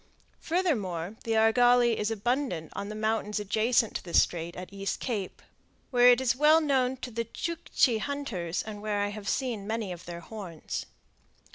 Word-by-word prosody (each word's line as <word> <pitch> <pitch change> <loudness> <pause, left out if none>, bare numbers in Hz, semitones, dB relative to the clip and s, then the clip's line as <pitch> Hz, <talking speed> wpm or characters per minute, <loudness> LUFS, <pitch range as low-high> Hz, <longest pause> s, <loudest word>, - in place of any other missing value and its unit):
Furthermore 215 - -1
the 225 - 0
argali 240 +1 +5
is 210 - 0
abundant 225 - -2
on 200 - -4
the 215 - -6
mountains 215 -1 -1
adjacent 220 +3 +1
to - - -13
the 175 - -4
Strait 170 0 +2
at 185 +2 -8
East 195 0 -3
Cape, 210 -7 -4 0.5
where 245 -1 +7
it 245 0 +6
is 250 -2 +1
well 300 +4 +6
known 265 -4 +1
to 250 - -7
the 230 +1 -2
Tschuckchi 280 -4 0
hunters 215 - -3
and 210 -1 -7
where 210 -1 -1
I 205 - 0
have 205 -1 -5
seen 235 -7 -2
many 220 -3 -2
of 175 -1 -8
their 170 0 -7
horns. 180 -5 -6
220 Hz, 170 wpm, -28 LUFS, 200-250 Hz, 0.5 s, where